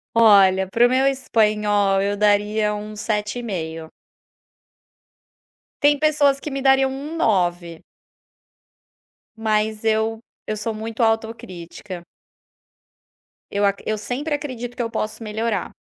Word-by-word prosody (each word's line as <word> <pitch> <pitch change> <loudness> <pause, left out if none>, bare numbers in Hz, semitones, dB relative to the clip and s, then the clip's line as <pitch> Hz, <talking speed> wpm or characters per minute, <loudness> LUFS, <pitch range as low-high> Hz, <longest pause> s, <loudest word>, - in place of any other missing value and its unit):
Olha 195 -4 +6
pra 235 +5 +4
o - - -3
meu 260 +2 +2
espanhol 210 -6 +2
eu 200 +1 -1
daria 210 +1 +2
um 210 +1 -6
7,5. 205 -7 -4 1.9
Tem 290 0 +4
pessoas 290 -2 +3
que 300 - -5
me 275 0 -3
dariam 270 0 +4
um 285 +4 -6
9. 175 - 0 1.6
Mas 215 0 0
eu 220 0 +1 0.3
eu 215 - -2
sou 220 +1 -3
muito 225 +2 -3
autocrítica. 205 -5 -3 1.5
Eu 200 0 +1
acr 200 0 0
eu 215 0 0
sempre 285 +8 -3
acredito 245 -4 -6
que 240 - -1
eu 230 - -4
posso 215 +1 -4
melhorar. 220 +2 -2
215 Hz, 115 wpm, -22 LUFS, 205-245 Hz, 1.9 s, Olha